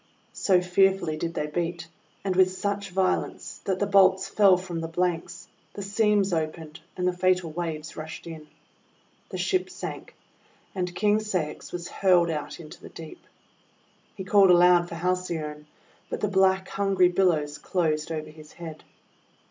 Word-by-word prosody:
So 185 Hz, -3 st, +3 dB
fearfully 180 Hz, -2 st, +2 dB
did 165 Hz, +2 st, -4 dB
they -, -, -1 dB
beat, 170 Hz, +2 st, -3 dB, 0.4 s
and 190 Hz, -2 st, -1 dB
with 185 Hz, 0 st, +5 dB
such 200 Hz, 0 st, -2 dB
vio 190 Hz, 0 st, +2 dB
lence, -, -, -9 dB
that 190 Hz, -1 st, 0 dB
the 205 Hz, -, 0 dB
bolts 190 Hz, -1 st, +4 dB
fell 195 Hz, -2 st, +5 dB
from 180 Hz, -2 st, -5 dB
the 165 Hz, -, -3 dB
blanks, 170 Hz, 0 st, -2 dB, 0.3 s
the 200 Hz, -, -5 dB
seams 205 Hz, -1 st, +2 dB
opened, 160 Hz, 0 st, -3 dB, 0.2 s
and 180 Hz, 0 st, 0 dB
the 180 Hz, -, +1 dB
fatal 180 Hz, -2 st, +1 dB
waves 160 Hz, -1 st, -5 dB
rushed 155 Hz, +1 st, -8 dB
in. 160 Hz, -2 st, -9 dB, 0.8 s
The -, -, -5 dB
ship 370 Hz, -2 st, 0 dB
sank, -, -, -7 dB, 0.6 s
and 180 Hz, -2 st, -3 dB
King 210 Hz, 0 st, +2 dB
Ceyx 185 Hz, -8 st, -3 dB
was 175 Hz, -1 st, -5 dB
hurled 180 Hz, -3 st, +3 dB
far 160 Hz, -, 0 dB
out 150 Hz, -, -9 dB
into 155 Hz, -2 st, -11 dB
the -, -, -11 dB
deep. 160 Hz, -1 st, -11 dB, 0.9 s
He 190 Hz, -, -6 dB
called 195 Hz, 0 st, +5 dB
aloud 175 Hz, 0 st, +5 dB
for -, -, -6 dB
Haley 180 Hz, 0 st, -1 dB
one, 150 Hz, 0 st, -7 dB, 0.4 s
but -, -, -4 dB
the 210 Hz, -, 0 dB
black 190 Hz, -1 st, +2 dB
hungry 195 Hz, -2 st, +2 dB
billows 165 Hz, -5 st, +1 dB
closed 160 Hz, -3 st, -1 dB
over 155 Hz, -1 st, -4 dB
his 155 Hz, -1 st, -15 dB
head. 160 Hz, -3 st, -9 dB
180 Hz, 165 wpm, -26 LUFS, 165-190 Hz, 0.9 s, with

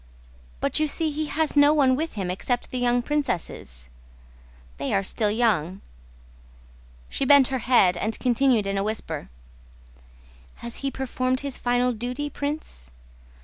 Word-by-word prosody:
but -, -, 0 dB
you 310 Hz, -, +2 dB
see 315 Hz, +1 st, 0 dB
he 305 Hz, +1 st, -3 dB
has 310 Hz, +1 st, -1 dB
no 290 Hz, 0 st, +6 dB
one 265 Hz, -3 st, +4 dB
with 320 Hz, +4 st, -3 dB
him 190 Hz, -4 st, -3 dB
except 245 Hz, +6 st, -2 dB
the 255 Hz, -, -2 dB
young 245 Hz, 0 st, +2 dB
princesses.... 170 Hz, -, -3 dB, 0.9 s
They -, -, -1 dB
are 195 Hz, -, +1 dB
still 210 Hz, +2 st, 0 dB
young...." 200 Hz, -5 st, 0 dB, 1.3 s
She -, -, -3 dB
bent 275 Hz, -1 st, +6 dB
her 265 Hz, -1 st, -1 dB
head 220 Hz, -7 st, +4 dB
and 220 Hz, +4 st, -2 dB
continued 245 Hz, -3 st, +2 dB
in 195 Hz, 0 st, -1 dB
a -, -, 0 dB
whisper: 200 Hz, -8 st, -3 dB, 1.3 s
"Has 235 Hz, 0 st, -8 dB
he 275 Hz, -, -2 dB
performed 255 Hz, -1 st, -2 dB
his 280 Hz, -2 st, -4 dB
final 245 Hz, 0 st, +1 dB
duty, 250 Hz, +6 st, -4 dB
Prince? 285 Hz, -, -5 dB
245 Hz, 145 wpm, -25 LUFS, 205-280 Hz, 1.3 s, no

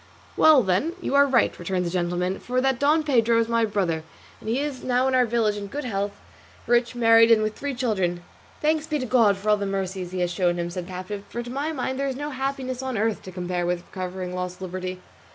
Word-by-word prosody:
"Well 305 Hz, -5 st, +6 dB
then, 190 Hz, -, +1 dB
you 350 Hz, -, -3 dB
are 280 Hz, 0 st, +6 dB
right," 250 Hz, -4 st, +3 dB
returned 180 Hz, +1 st, -1 dB
the 170 Hz, -, -2 dB
gentleman, 180 Hz, +1 st, -1 dB
"for 250 Hz, +1 st, -1 dB
that 265 Hz, -1 st, +1 dB
Don 300 Hz, +3 st, +3 dB
Pedro 235 Hz, -6 st, +3 dB
is 230 Hz, -, +1 dB
my 230 Hz, -1 st, +2 dB
brother, 185 Hz, -7 st, -1 dB, 0.4 s
and 220 Hz, -, -7 dB
he 240 Hz, +4 st, +1 dB
is 285 Hz, -3 st, -4 dB
now 255 Hz, +1 st, +2 dB
in 265 Hz, -, 0 dB
our 250 Hz, -1 st, +4 dB
village 220 Hz, -2 st, +1 dB
in 200 Hz, -1 st, -5 dB
good 290 Hz, +8 st, -5 dB
health, 200 Hz, -3 st, -2 dB, 0.5 s
rich, 240 Hz, 0 st, +2 dB
married, 230 Hz, -1 st, +6 dB
and 220 Hz, -1 st, +5 dB
with 215 Hz, 0 st, -1 dB
three 280 Hz, +2 st, -4 dB
children." 190 Hz, -8 st, -1 dB, 0.4 s
"Thanks 310 Hz, 0 st, +1 dB
be 305 Hz, -, 0 dB
to 255 Hz, -, -3 dB
God 225 Hz, -5 st, +4 dB
for 205 Hz, +2 st, -3 dB
all 210 Hz, -, +4 dB
the 200 Hz, -1 st, -3 dB
mercies 190 Hz, -2 st, -3 dB
he 185 Hz, -1 st, -3 dB
has 175 Hz, 0 st, 0 dB
shown 175 Hz, 0 st, +1 dB
him," 175 Hz, 0 st, -3 dB
said 180 Hz, 0 st, -5 dB
the -, -, -9 dB
captive; 185 Hz, +2 st, -6 dB
"for 240 Hz, -, -4 dB
to 240 Hz, -, -8 dB
my 285 Hz, +4 st, -2 dB
mind 260 Hz, -2 st, -3 dB
there 275 Hz, -, 0 dB
is 265 Hz, -, -2 dB
no 290 Hz, +2 st, -4 dB
happiness 265 Hz, -1 st, -3 dB
on 260 Hz, -3 st, -3 dB
earth 220 Hz, +1 st, 0 dB
to 185 Hz, -, -9 dB
compare 180 Hz, 0 st, -3 dB
with 175 Hz, 0 st, -1 dB
recovering 185 Hz, -1 st, -5 dB
lost 180 Hz, 0 st, -4 dB
liberty." 185 Hz, 0 st, -5 dB
220 Hz, 240 wpm, -24 LUFS, 185-260 Hz, 0.5 s, Well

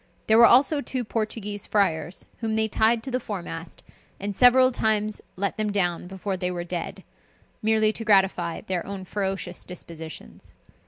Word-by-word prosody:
There 220 Hz, +1 st, +5 dB
were 235 Hz, -, +9 dB
also 285 Hz, +4 st, +4 dB
two 255 Hz, -3 st, -3 dB
Portuguese 215 Hz, -2 st, -3 dB
friars, 185 Hz, -4 st, 0 dB
whom 220 Hz, -1 st, -1 dB
they 220 Hz, 0 st, +2 dB
tied 225 Hz, +1 st, +2 dB
to 265 Hz, -, -5 dB
the 255 Hz, -, 0 dB
foremast, 175 Hz, -7 st, -7 dB, 0.4 s
and 200 Hz, 0 st, -4 dB
several 255 Hz, +2 st, +6 dB
times 215 Hz, -3 st, 0 dB
let 200 Hz, +2 st, -2 dB
them 215 Hz, -1 st, -1 dB
down 180 Hz, -3 st, 0 dB
before 190 Hz, +1 st, -4 dB
they 180 Hz, -1 st, -1 dB
were 175 Hz, -1 st, -3 dB
dead, 175 Hz, -1 st, -5 dB, 0.6 s
merely 220 Hz, 0 st, +3 dB
to 225 Hz, -, -5 dB
gratify 190 Hz, -5 st, +2 dB
their 180 Hz, -2 st, -3 dB
own 195 Hz, -1 st, -7 dB
ferocious 190 Hz, -2 st, -3 dB
dispositions. 165 Hz, -3 st, -9 dB
205 Hz, 160 wpm, -25 LUFS, 180-220 Hz, 0.6 s, were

